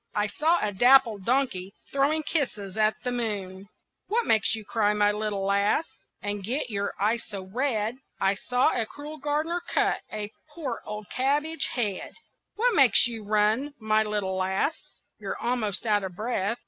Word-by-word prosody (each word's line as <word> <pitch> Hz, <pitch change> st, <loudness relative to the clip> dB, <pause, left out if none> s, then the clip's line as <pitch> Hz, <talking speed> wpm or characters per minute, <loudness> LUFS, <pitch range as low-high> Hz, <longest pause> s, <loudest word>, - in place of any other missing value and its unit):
"I 210 Hz, -, +2 dB
saw 315 Hz, +11 st, +2 dB
a 210 Hz, -1 st, -1 dB
dappled 235 Hz, -2 st, +5 dB
donkey 225 Hz, -7 st, 0 dB, 0.2 s
Throwing 290 Hz, +3 st, +2 dB
kisses 220 Hz, -, -2 dB
at 215 Hz, 0 st, +2 dB
the 250 Hz, -, -1 dB
moon." 200 Hz, -5 st, -3 dB, 0.4 s
"What 460 Hz, +3 st, +1 dB
makes 220 Hz, 0 st, +3 dB
you 220 Hz, -1 st, -8 dB
cry, 210 Hz, 0 st, +1 dB
my 205 Hz, 0 st, +4 dB
little 210 Hz, -2 st, -2 dB
lass, 200 Hz, +10 st, +2 dB, 0.4 s
And 205 Hz, -1 st, -2 dB
get 250 Hz, +4 st, -1 dB
your 200 Hz, -1 st, -2 dB
eyes 220 Hz, +4 st, +1 dB
so 200 Hz, -3 st, -6 dB
red?" 225 Hz, +2 st, -1 dB, 0.2 s
"I 195 Hz, 0 st, +3 dB
saw 250 Hz, +5 st, +1 dB
a 230 Hz, -3 st, -1 dB
cruel 295 Hz, +4 st, -9 dB
gardener 305 Hz, +5 st, -1 dB
cut -, -, +1 dB
A 210 Hz, -1 st, -4 dB, 0.2 s
poor 270 Hz, -8 st, -4 dB
old 210 Hz, -2 st, -7 dB
cabbage 290 Hz, +5 st, 0 dB
head." 210 Hz, -7 st, -2 dB, 0.4 s
"What 485 Hz, +2 st, +2 dB
makes 270 Hz, -, +6 dB
you 230 Hz, -2 st, -3 dB
run, 215 Hz, +7 st, +1 dB
my 215 Hz, -1 st, +2 dB
little 205 Hz, -3 st, -1 dB
lass? 190 Hz, +10 st, +1 dB, 0.5 s
You're -, -, -4 dB
almost 235 Hz, -4 st, -1 dB
out 210 Hz, -2 st, +2 dB
of 185 Hz, -2 st, -5 dB
breath." 220 Hz, 0 st, -1 dB
220 Hz, 165 wpm, -27 LUFS, 205-265 Hz, 0.5 s, makes